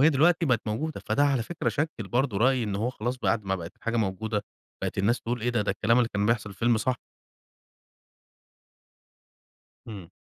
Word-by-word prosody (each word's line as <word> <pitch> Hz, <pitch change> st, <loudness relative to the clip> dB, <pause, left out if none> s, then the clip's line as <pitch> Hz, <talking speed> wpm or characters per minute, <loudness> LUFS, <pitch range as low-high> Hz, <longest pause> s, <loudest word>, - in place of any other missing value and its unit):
وهي 150 Hz, +3 st, +7 dB
دلوقتي 165 Hz, +4 st, +3 dB
بقت 125 Hz, -5 st, +3 dB
موجودة، 145 Hz, +9 st, -2 dB
فده 145 Hz, -, +3 dB
على 135 Hz, -5 st, +2 dB
فكرة 175 Hz, +8 st, -2 dB
شكِّل 145 Hz, -9 st, -2 dB
برضه 125 Hz, -2 st, +1 dB
رأي 130 Hz, +2 st, +3 dB
إن 105 Hz, -3 st, -2 dB
هو 115 Hz, +5 st, 0 dB
خلاص 120 Hz, +1 st, -3 dB
بعد 110 Hz, -2 st, +1 dB
ما 95 Hz, 0 st, 0 dB
بقت 85 Hz, -3 st, -7 dB
الحاجة 115 Hz, 0 st, -2 dB
موجودة، 105 Hz, 0 st, -1 dB, 0.4 s
بقت -, -, -2 dB
الناس 110 Hz, +5 st, +2 dB
تقول 120 Hz, +1 st, -3 dB
إيه 120 Hz, +3 st, 0 dB
ده؟ 120 Hz, -3 st, +1 dB
ده 105 Hz, -, 0 dB
الكلام 105 Hz, +4 st, +2 dB
اللي 120 Hz, -2 st, +3 dB
كان 100 Hz, 0 st, +1 dB
بيحصل 115 Hz, -1 st, +2 dB
في 95 Hz, -, -17 dB
الفيلم 120 Hz, 0 st, +3 dB
صح. 125 Hz, +3 st, 0 dB, 2.9 s
إمم. 100 Hz, -6 st, -8 dB
115 Hz, 190 wpm, -27 LUFS, 105-130 Hz, 2.9 s, وهي